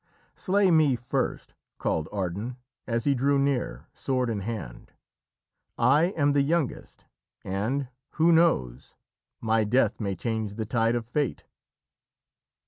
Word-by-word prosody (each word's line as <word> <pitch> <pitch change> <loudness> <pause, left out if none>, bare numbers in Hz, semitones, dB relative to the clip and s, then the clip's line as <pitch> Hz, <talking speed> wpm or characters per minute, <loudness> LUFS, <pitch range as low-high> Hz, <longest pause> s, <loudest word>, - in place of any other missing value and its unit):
"Slay 195 -1 +2
me 155 -5 +4
first!" 120 0 -3 0.2
called 80 -1 -1
Ardan 100 +5 -3 0.3
as 115 -1 0
he 140 - +3
drew 140 +2 +2
near, 140 -2 -1
sword 130 -3 -1
in 105 - -2
hand. 100 - -6 0.8
"I 145 +5 +4
am 145 -1 +3
the 140 - +3
youngest, 150 0 -2 0.4
and, 115 +9 -2 0.3
who 165 +1 +4
knows, 70 - +2 0.5
my 110 -1 +2
death 110 0 +2
may 100 -4 -2
change 110 +1 -3
the 110 0 -3
tides 115 +2 +1
of 115 - -4
fate!" 140 +4 -2
120 Hz, 130 wpm, -27 LUFS, 110-140 Hz, 0.8 s, me